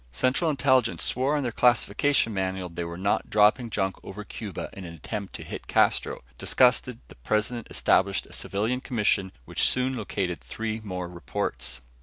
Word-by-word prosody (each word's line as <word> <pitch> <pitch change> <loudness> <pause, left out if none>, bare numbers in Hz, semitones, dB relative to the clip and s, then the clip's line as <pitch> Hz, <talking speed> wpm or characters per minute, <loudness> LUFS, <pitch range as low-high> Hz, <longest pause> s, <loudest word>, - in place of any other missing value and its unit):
Central 130 - +2
Intelligence 130 - +2
swore 135 +4 +1
on 145 - -1
their 120 - -1
classification 120 +1 +3
manual 95 -1 -2
they 85 +1 -4
were 85 0 -6
not 100 +3 0
dropping 105 +3 +4
junk 95 -2 -1
over 105 +2 -7
Cuba 105 -3 -6
in 95 - -8
an 85 -2 -8
attempt 100 +5 -5
to - - -6
hit - - -7
Castro. - - +2 0.2
Disgusted, - - +3
the - - -13
President 110 - -1
established 100 +1 +2
a - - -14
civilian 110 +6 -1
commission 105 -6 +1
which - - +1
soon 130 +1 0
located 90 - -2
three 110 - -4
more 90 -3 -4
reports. 85 -7 -3
105 Hz, 165 wpm, -27 LUFS, 95-125 Hz, 0.2 s, dropping